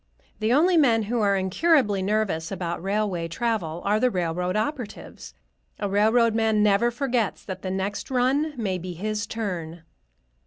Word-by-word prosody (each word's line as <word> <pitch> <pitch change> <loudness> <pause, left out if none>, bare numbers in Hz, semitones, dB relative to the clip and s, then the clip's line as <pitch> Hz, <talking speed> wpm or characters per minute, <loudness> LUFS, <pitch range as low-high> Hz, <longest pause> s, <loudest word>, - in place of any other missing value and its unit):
The 215 +1 0
only 335 +7 +4
men 235 -7 +4
who 230 +2 -1
are 200 -1 +3
incurably 205 - +2
nervous 195 -5 -1
about 175 -3 -3
railway 195 -3 -1
travel 175 -4 -2
are 210 +2 +2
the 255 - +3
railroad 180 -2 -2
operatives. 225 0 -5 0.4
A 205 - -2
railroad 220 +3 +3
man 220 -1 +2
never 210 +3 +3
forgets 240 -3 -1
that 190 -1 -6
the 190 - -4
next 190 +2 -3
run 270 +4 +1
may 195 -5 -2
be 180 +1 -6
his 210 +5 -3
turn. 175 -7 -5
210 Hz, 155 wpm, -25 LUFS, 185-235 Hz, 0.4 s, only